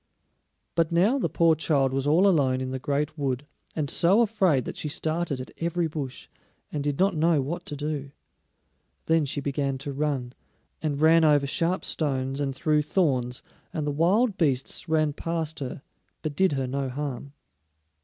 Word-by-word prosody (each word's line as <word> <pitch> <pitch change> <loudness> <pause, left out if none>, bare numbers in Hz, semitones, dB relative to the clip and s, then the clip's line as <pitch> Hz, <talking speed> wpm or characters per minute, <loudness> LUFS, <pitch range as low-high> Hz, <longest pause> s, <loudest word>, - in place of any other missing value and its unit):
But 165 -1 +1
now 200 +11 +3
the - - 0
poor 165 -1 +4
child 140 -4 +1
was 135 +1 0
all 170 +7 +5
alone 135 -8 +3
in 130 0 -3
the 130 - -3
great 150 +3 -2
wood, 135 0 -1 0.3
and 150 -3 -1
so 180 - +4
afraid 190 - +2
that - - -5
she - - -4
started 160 -1 -1
at 130 - -7
every 170 +1 0
bush, 145 -5 -5 0.4
and 145 -2 -2
did 145 -1 -1
not 195 -1 +2
know 160 0 +3
what 170 +6 -4
to 145 - -4
do. 145 -1 -3 1.0
Then 160 -2 +3
she 140 +1 -2
began 140 -1 -1
to 140 +1 -5
run, 135 -4 -2 0.5
and 145 -3 -1
ran 160 +1 +5
over 145 -2 +4
sharp 170 +6 0
stones 135 -2 -1
and 135 -2 -2
through 150 +3 +2
thorns, 135 -7 0 0.3
and 155 -2 -3
the 145 - 0
wild 190 - +2
beasts 140 +1 0
ran 155 -2 +2
past 160 0 -3
her, 135 0 -6 0.4
but 155 -2 -3
did 190 0 +3
her 135 -1 -1
no 135 +1 -2
harm. 140 0 -5
150 Hz, 175 wpm, -26 LUFS, 135-165 Hz, 1.0 s, all